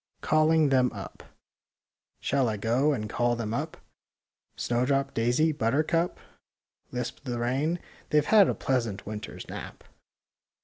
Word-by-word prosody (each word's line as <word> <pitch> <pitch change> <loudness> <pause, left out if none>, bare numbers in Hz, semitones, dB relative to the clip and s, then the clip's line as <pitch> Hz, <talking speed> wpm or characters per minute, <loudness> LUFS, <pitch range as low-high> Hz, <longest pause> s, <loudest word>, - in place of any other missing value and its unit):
CALLING 155 0 +4
THEM 130 -2 +3
UP 100 -3 -8
ii - - -18 0.9
Shall 135 -3 +1
I 105 - -2
go 120 +8 +2
and 110 -7 -2
call 120 +2 +1
them 115 -2 -3
up,— - - -3 0.8
Snowdrop, 135 +3 0
daisy, 125 +8 +2
buttercup? 155 +7 +1 0.4
" - - -47
Lisped 125 +3 -5
the 120 -2 -2
rain. 135 +8 0 0.2
'' - - -26
They've 150 -1 +3
had 210 0 +6
a - - 0
pleasant 115 -7 -1
winter's 105 0 -7
nap." - - -8
125 Hz, 140 wpm, -28 LUFS, 115-150 Hz, 0.9 s, had